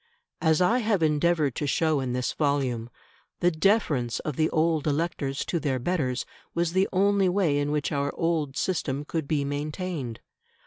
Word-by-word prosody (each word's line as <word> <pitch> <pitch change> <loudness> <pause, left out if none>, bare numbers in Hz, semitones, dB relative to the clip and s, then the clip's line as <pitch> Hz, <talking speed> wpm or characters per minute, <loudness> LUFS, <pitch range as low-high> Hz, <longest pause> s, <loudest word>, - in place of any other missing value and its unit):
As 160 0 +3
I 230 +8 +3
have 210 -7 +1
endeavoured 155 -2 +2
to 145 - -1
show 155 0 +2
in 130 -2 -2
this 125 0 -1
volume, 135 -6 0 0.5
the 175 - +3
deference 155 - +1
of 150 - -4
the 155 +2 +2
old 160 -1 +1
electors 145 -2 -1
to 170 - -1
their 140 -4 0
betters 130 -3 -1 0.3
was 170 0 0
the 190 +1 +2
only 195 0 +3
way 175 -6 +2
in 145 0 0
which 150 +1 -1
our 140 -1 0
old 160 -5 -1
system 145 -6 -1
could 160 -2 -3
be 145 -2 0
maintained. 145 -3 -4
155 Hz, 170 wpm, -26 LUFS, 140-170 Hz, 0.5 s, As